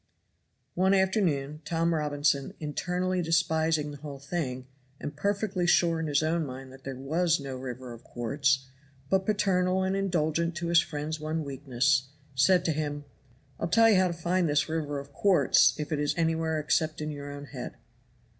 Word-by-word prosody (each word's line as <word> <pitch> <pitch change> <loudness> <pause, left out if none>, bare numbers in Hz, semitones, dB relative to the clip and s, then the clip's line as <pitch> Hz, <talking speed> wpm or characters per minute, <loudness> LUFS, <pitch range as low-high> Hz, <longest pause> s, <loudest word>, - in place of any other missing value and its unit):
One 190 +2 +3
afternoon 165 -7 +1
Tom 165 +1 0
Robinson, 145 -2 0
internally 180 +4 -1
despising 160 -2 +1
the 145 - -8
whole 140 -1 -8
thing, 135 -3 -4 0.3
and 145 - -6
perfectly 195 +1 -1
sure 170 -1 +3
in 160 - -2
his 145 0 +2
own 165 +1 +1
mind 130 -1 -8
that 135 0 -15
there 135 -1 -4
was 160 +6 +1
no 135 -2 -5
river 125 -1 -7
of 115 - -13
quartz, 135 +2 0 0.5
but 190 0 +2
paternal 190 -3 +2
and 190 +1 0
indulgent 170 -3 0
to 170 0 -3
his 170 0 +6
friend's 150 +1 -4
one 155 +1 -2
weakness, 135 -1 0 0.3
said 175 +7 +4
to 165 - +2
him: 145 -1 -3 0.5
"I'll - - -1
tell 225 +5 +5
you - - +5
how 185 0 +4
to 175 - -2
find 175 0 0
this 145 0 +2
river 155 -3 -2
of 140 0 -8
quartz, 190 -1 +4
if 150 0 -4
it 150 - 0
is 145 0 0
anywhere 160 -1 +1
except 155 +1 0
in 150 0 -3
your 145 -1 -7
own 145 0 -8
head." - - -7
155 Hz, 175 wpm, -28 LUFS, 145-175 Hz, 0.5 s, his